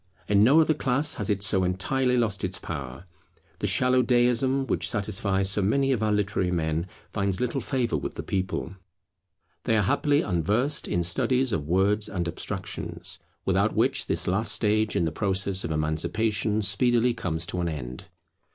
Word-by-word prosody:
In 100 0 +4
no 140 +8 +6
other 155 0 +3
class 145 0 +1
has 105 - -1
it 100 -1 0
so 100 -2 +1
entirely 125 +8 0
lost 110 -5 0
its 90 -1 -2
power. 70 -1 -7 0.5
The - - -1
shallow 125 0 +3
deism, 125 +2 +2
which - - +1
satisfies 100 -2 0
so 100 - 0
many 135 +8 +1
of 125 -5 0
our 110 -1 +1
literary 100 -3 0
men, 80 0 -1 0.3
finds 100 -3 -1
little 125 +2 -1
favour 125 -4 -1
with - - -5
the - - -5
people. 95 -3 -3 0.9
They 110 - +2
are 105 - +2
happily 145 +9 +2
unversed 105 - 0
in 85 - 0
studies 125 +8 +1
of 75 -7 -2
words 100 +5 +2
and 90 -3 -3
abstractions, 85 - -5 0.3
without - - +1
which - - +1
this - - 0
last 100 +5 +1
stage 110 0 +1
in 85 - +1
the 80 - -1
process 95 +1 0
of - - -3
emancipation 95 +8 -1
speedily 120 +2 +2
comes 85 -8 -3
to 90 - -4
an 85 -1 -1
end. 65 -5 -7
105 Hz, 170 wpm, -26 LUFS, 90-120 Hz, 0.9 s, no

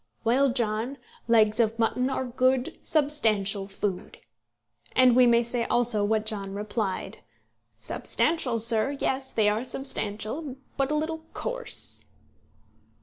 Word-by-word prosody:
'Well, 265 +4 +3
John, 235 +1 -1 0.3
legs 220 -1 +4
of 225 -1 +2
mutton 250 +3 +1
are 265 -1 -2
good 255 +1 0
substantial 220 -10 +1
food;' 195 -1 -4 0.8
and 255 -2 +6
we 250 -1 +6
may 235 0 +4
say 235 0 0
also 240 -3 +2
what 215 +1 +1
John 200 -2 -3
replied: 205 -1 -3 0.6
'Substantial, 275 -8 0
sir; 230 +5 +1
yes, 265 0 -1
they 215 -2 +2
are 210 +3 +1
substantial, 255 +2 -3 0.2
but 275 -1 0
a 300 - 0
little 320 +1 -3
coarse.'" - - -4
235 Hz, 125 wpm, -27 LUFS, 215-265 Hz, 0.8 s, and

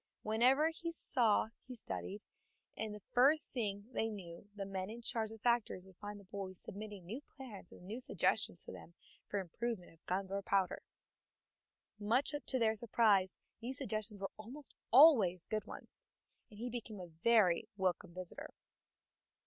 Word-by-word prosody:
Whatever 255 +8 +4
he 335 +1 -4
saw 235 -9 +2 0.2
he 255 - -7
studied, 210 -2 -5 0.5
and 220 -1 -3
the 210 - -11
first 290 +5 +5
thing 205 -5 -2
they 225 - +1
knew 190 -2 -8
the 200 -1 -4
men 190 0 -3
in 235 +2 -8
charge 225 -1 +1
of 225 - -9
the - - -30
factories 235 -6 +1
would 190 -2 -17
find 205 0 -7
the - - -14
boy 190 0 -6
submitting 200 0 -7
new 225 +10 -5
plans 245 -11 -11
and - - -13
new 220 +6 -5
suggestions 255 - +1
to - - -8
them 170 - -11 0.3
for 205 - -2
the - - +1
improvement 190 0 -4
of 165 - -26
guns 190 +1 -1
or 200 0 -1
powder. 195 -2 +1 1.2
Much 235 +8 +2
to 260 - +5
their 225 -3 +3
surprise 210 -4 +3 0.2
these 255 +3 -3
suggestions 215 -5 -1
were 195 - -4
almost 255 +7 -8 0.2
always 225 - +7
good 215 -1 -2
ones, - - -10 0.5
and 210 - -14
he 235 +3 -3
became 225 -3 -5
a 180 - -6
very 185 +4 +3
welcome 185 -3 0
visitor. 180 0 -7
210 Hz, 170 wpm, -36 LUFS, 190-235 Hz, 1.2 s, always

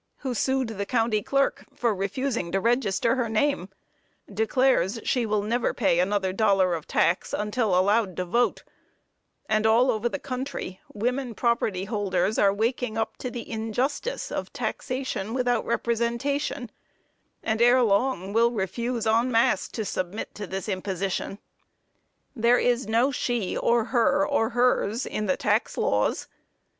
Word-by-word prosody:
who 260 -3 -2
sued 265 0 0
the 200 -2 -4
County 225 -3 +1
Clerk 275 +5 0
for 235 -2 +1
refusing 200 0 -2
to 195 - +1
register 230 0 +1
her 240 -3 0
name, 220 -3 0 0.6
declares 225 -1 +2
she 245 -3 0
will 210 -1 0
never 235 +3 0
pay 195 -6 +2
another 190 0 +1
dollar 195 -3 +3
of 160 -3 -5
tax 175 - +1
until 210 -2 0
allowed 200 0 +2
to 180 - -1
vote; 235 +7 +1 0.8
and 215 0 +2
all 240 +4 +4
over 230 +1 -1
the 285 - -3
country, 260 -8 -5
women 245 +3 -2
property 220 -6 0
holders 205 -1 0
are 200 - +5
waking 225 +2 -1
up 220 0 -2
to 250 - -4
the 240 -1 -7
injustice 245 - -2
of - - -4
taxation 255 -5 -3
without 245 -2 0
representation, 235 +3 -1 0.7
and 220 0 0
ere 245 +1 +6
long 200 -2 +1
will 230 +1 +4
refuse, 235 +2 -2
en 230 +3 +2
masse, 225 -4 +2
to 220 - -5
submit 185 +2 -4
to 205 -1 -7
the 190 0 -4
imposition. 190 +1 -3 1.0
There 235 +1 +4
is 245 -2 +1
no 235 +5 +2
she, 240 -6 -1
or 235 -1 +2
her, 270 +4 +2
or 225 -6 +1
hers, 245 -1 +1
in 215 0 -3
the 185 - +1
tax 210 +3 0
laws. - - 0
225 Hz, 150 wpm, -26 LUFS, 200-245 Hz, 1.0 s, ere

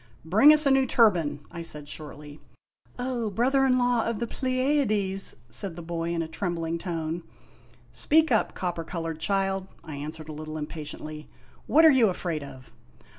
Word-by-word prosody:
" 115 - -29
Bring 220 - +7
us 305 0 +5
a 275 - +4
new 270 -1 +4
turban," 170 - +3
I 170 -1 -6
said 150 -3 -5
shortly. 150 0 -8 0.6
"O 245 -3 -2
Brother 265 +6 +2
in 255 -1 +3
Law 245 -2 +2
of 230 -1 -2
the 235 - -2
Pleiades 255 -7 0
" - - -31
said 195 -5 -4
the 170 - -8
boy 165 0 -3
in 170 -1 -1
a - - -6
trem 175 +2 -3
bling 165 0 -3
tone. 165 -1 -3
O - - -27 0.3
" - - -29
Speak 315 -1 +2
up, 220 - +2
copper 175 -2 -3
colored 165 -1 -5
child," 195 +1 0 0.2
I 155 -3 -7
answered 155 +2 -7
a - - -5
little 155 +1 -6
impatiently. 150 0 -7 0.4
"What 320 +3 +6
are 320 - +9
you 255 -5 +5
afraid 170 -4 -3
of? 130 -2 -12
175 Hz, 190 wpm, -27 LUFS, 160-240 Hz, 0.6 s, are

